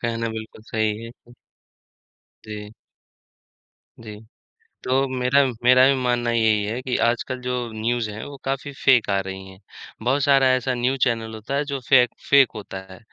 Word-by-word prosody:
कहना 115 -1 -2
बिल्कुल 110 0 -8
सही 110 0 -2
है। 115 - -8 1.3
जी। 105 0 -8 1.3
जी। 105 -2 -9 0.7
तो 135 +2 +1
मेरा, 130 +1 +2 0.2
मेरा 130 +1 +6
भी 140 - +4
मानना 120 -1 0
यही 110 -2 +2
है 115 +5 -3
कि 130 -1 -3
आजकल 120 +2 -1
जो 125 0 -3 0.2
न्यूज़ 115 0 -1
है, 110 +1 -7
वो 140 - -9
काफ़ी 135 +1 -3
फेक 125 -6 +4
आ 100 - +2
रही 95 0 -7
हैं, 95 - -14 0.5
बहुत 135 +4 +1
सारा 135 -2 +4
ऐसा 130 0 -1
न्यूज़ 125 +2 -1
चैनल 115 -3 -1
होता 110 +6 -5
है, 145 - +1
जो 140 -1 -4
फेक 125 -3 +5 0.2
फेक 140 -3 +6
होता 100 -2 -7
है, 95 - -12
120 Hz, 165 wpm, -22 LUFS, 110-130 Hz, 1.3 s, मेरा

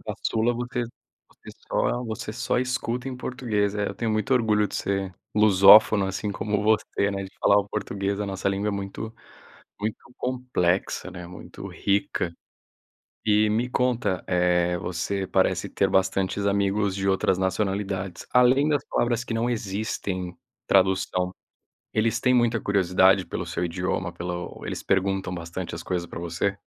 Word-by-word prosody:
O - - -22
caçula 115 +2 0
você 120 +1 -3 0.5
você - - -14 0.2
só 125 +1 0
você 110 -1 -5
só 120 +2 -1
escuta 125 0 -2
em 130 - -5
português. 110 -6 -1
É, 105 -1 -1
eu - - -6
tenho 115 -2 -2
muito 110 +3 0
orgulho 105 -4 +2
de - - -9
ser 95 -1 -2 0.2
lusófono, 105 0 +7
assim 95 +2 -3
como 105 +1 -1
você, 105 -2 +1
né, 100 -1 -3
de 95 - -10
falar 100 - +5
o 100 0 -2
português, 100 -1 -2
a 105 - -1
nossa 95 0 -2
língua 100 +2 -1
é - - +1
muito 100 +3 -5 0.7
muito 105 +1 -2 0.2
complexa, 125 -8 -1
né, 90 -1 -8
muito 90 - -10
rica. 100 -3 -1 0.9
E 105 0 +4
me 115 +4 0
conta, 120 -7 0
eh, 90 -1 +2
você 90 +3 -2
parece - - +1
ter - - +1
bastantes 95 +1 +1
amigos 100 0 +1
de 95 0 -1
outras 95 -1 +2
nacionalidades. 95 0 -2
Além 125 +4 +5
das 145 -2 +1
palavras 120 -1 +1
que 115 - -4
não 115 +2 0
existem 95 -4 -3 0.3
tradução, 95 -1 +2 0.6
eles 115 +1 +1
têm 125 - +3
muita 120 -2 +3
curiosidade 95 -1 +3
pelo - - -4
seu 90 - -2
idioma, 90 0 -2
pelo 90 +1 -5
o - - -8
eles - - -4
perguntam 95 -1 0
bastante 85 +1 -5
as 85 - -6
coisas 90 -2 -2
para - - -7
você? 85 +4 -1
100 Hz, 160 wpm, -25 LUFS, 95-110 Hz, 0.9 s, lusófono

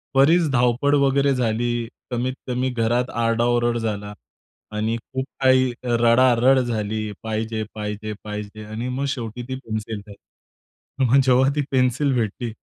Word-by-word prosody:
बरीच 160 +4 +5
धावपळ 125 +3 +2
वगैरे 140 +1 +3
झाली. 120 0 -1 0.2
कमीत 125 +1 -1
कमी 125 +1 0
घरात 120 +1 0
आरडाओरड 120 +1 +2
झाला 105 -2 -3 0.6
आणि 110 +2 0
खूप 130 +3 -5 0.2
काही 130 -1 +4 0.2
रडारड 120 +2 +4
झाली 110 -3 -2
"पाहिजे, 110 0 -2
पाहिजे, 105 0 -4
पाहिजे." 105 0 -6
आणि 110 +4 -5
मग 135 +2 -2
शेवटी 120 -2 -4
ती 130 - -2
पेन्सिल 110 0 -4
भेटली. 100 - -12 0.9
मग 135 +3 +5
जेव्हा 130 +1 +4
ती 150 - +1
पेन्सिल 130 +1 +2
भेटली. 115 0 -2
120 Hz, 135 wpm, -22 LUFS, 110-130 Hz, 0.9 s, बरीच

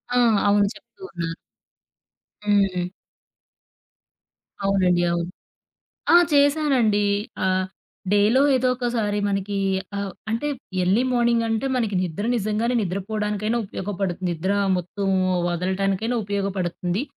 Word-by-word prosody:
ఆ! - - +3 0.3
అవును 205 0 +4
చెప్తూ 450 - -19
ఉన్నారు. 165 -1 -4 1.2
హ్మ్. 190 -3 +2 1.7
అవునండి, 185 -3 +2
అవును. 170 0 -1 0.9
ఆ! - - +10 0.2
చేశానండి 280 -8 +3 0.4
ఆహ్, 185 0 +1 0.5
డేలో 210 +6 +4
ఏదోకసారి 240 -4 0
మనకి 200 0 -2 0.4
ఆహ్, 200 -2 -3 0.2
అంటే 230 +7 -1 0.3
ఎర్లీ 190 +7 +3
మార్నింగంటే 235 0 +1
మనకి 225 -5 0
నిద్ర 180 +3 -3
నిజంగానే 220 +3 0
నిద్రపోవడానికైనా 210 +3 -2
ఉపయోగపడుతుంది, 190 -2 -3
నిద్ర 170 +4 -1 0.3
మొత్తం 190 +3 -4 0.4
వదలటానికైనా 195 +6 -1
ఉపయోగపడుతుంది. 195 -1 -2
200 Hz, 90 wpm, -23 LUFS, 185-230 Hz, 1.7 s, ఆ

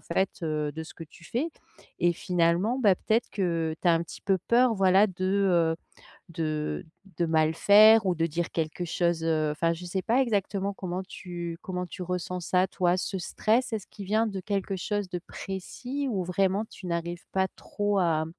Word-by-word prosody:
fait, 190 +3 0
heu, 155 -2 -1 0.2
de 160 - -5
ce - - -12
que 165 - -9
tu 165 +2 -18
fais 260 - -1 0.5
et 175 0 +3
finalement, 180 +7 +1
bah, 205 -6 +5
peut-être 220 +5 0
que 165 -5 -1
tu 180 - +3
as - - +6
un 165 0 +2
petit - - -11
peu 195 -1 +1
peur 240 +6 +3
voilà 195 +1 +5
de, 185 0 -5 0.5
heu, - - -12 0.5
de 155 +1 -3 0.3
de 170 - +3
mal 160 0 +3
faire 215 +4 +7
ou 180 - +2
de 165 - +1
dire 170 +1 -2
quelque 160 +2 -2
chose, 170 -1 0
heu 155 -2 +1
enfin 165 +3 +1
je 170 +2 -8
sais 185 +2 -2
pas 245 +4 +3
exactement 200 -4 0
comment 185 -1 -4
tu 175 -3 -6
comment 180 -2 -4
tu 185 - -9
ressens 180 0 -3
ça 185 +2 +2
toi? 180 -1 +1
Ce 190 +1 -2
stress, 225 +7 0
est-ce 215 -3 -3
qu'il 200 -2 -9
vient 220 +3 +2
de 195 -2 -4
quelque 195 0 -2
chose 205 +2 -2
de 180 - -3
précis 245 +10 -5
ou 195 -5 -1
vraiment 190 +4 +1
tu 190 - -13
n'arrives 170 +1 -3
pas 190 0 +1
trop 205 -1 -1
à 160 -3 +2
185 Hz, 195 wpm, -27 LUFS, 170-200 Hz, 0.5 s, faire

